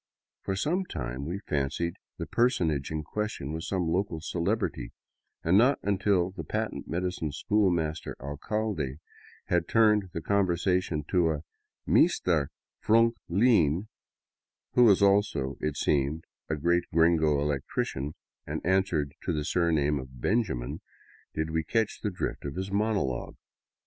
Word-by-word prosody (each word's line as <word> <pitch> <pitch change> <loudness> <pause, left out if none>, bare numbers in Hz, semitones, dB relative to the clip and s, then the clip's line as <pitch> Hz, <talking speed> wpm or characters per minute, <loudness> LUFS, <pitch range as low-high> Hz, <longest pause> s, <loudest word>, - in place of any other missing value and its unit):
For 95 - -2
some 175 - 0
time 65 - -5
we 95 +4 -4
fancied 75 +4 -1 0.2
the - - -4
per 120 +1 +3
sonage 80 - -1
in 80 -1 -3
question 105 -5 -4
was 80 0 -4
some 90 -3 -1
local 85 0 0
celebrity, 85 +1 -2 0.5
and 90 +5 +5
not 130 +4 +4
until 95 -2 +1
the 90 -3 -7
patent - - -3
medicine 90 -2 -2
schoolmaster 85 -3 0
alcalde 75 0 -3 0.5
had 85 -1 +1
turned 105 -4 +4
the 85 - -3
conversation 90 -4 +1
to 90 -3 +3
a 75 -2 -2 0.3
" - - -52
Meestare 80 -6 +3 0.4
Frunk 115 +2 +4 0.2
Lean," 95 - +3 0.8
who 125 - +6
was 100 -3 +5
also, 100 -9 +2
it 75 -2 -2
seemed, 75 +2 +1 0.3
a 80 - +1
great 85 +4 +1
gringo 80 -3 +4
electrician, 70 0 -2 0.3
and - - -4
answered 90 -6 +1
to - - -2
the 75 -1 -2
surname 75 -5 +1
of 65 -1 -10
Benjamin, 65 - -1 0.5
did 80 +1 -1
we 80 0 0
catch 110 +5 0
the 105 - 0
drift 90 - -4
of 70 0 -5
his 95 +1 -4
monologue. 100 - -1
85 Hz, 140 wpm, -28 LUFS, 75-100 Hz, 0.8 s, who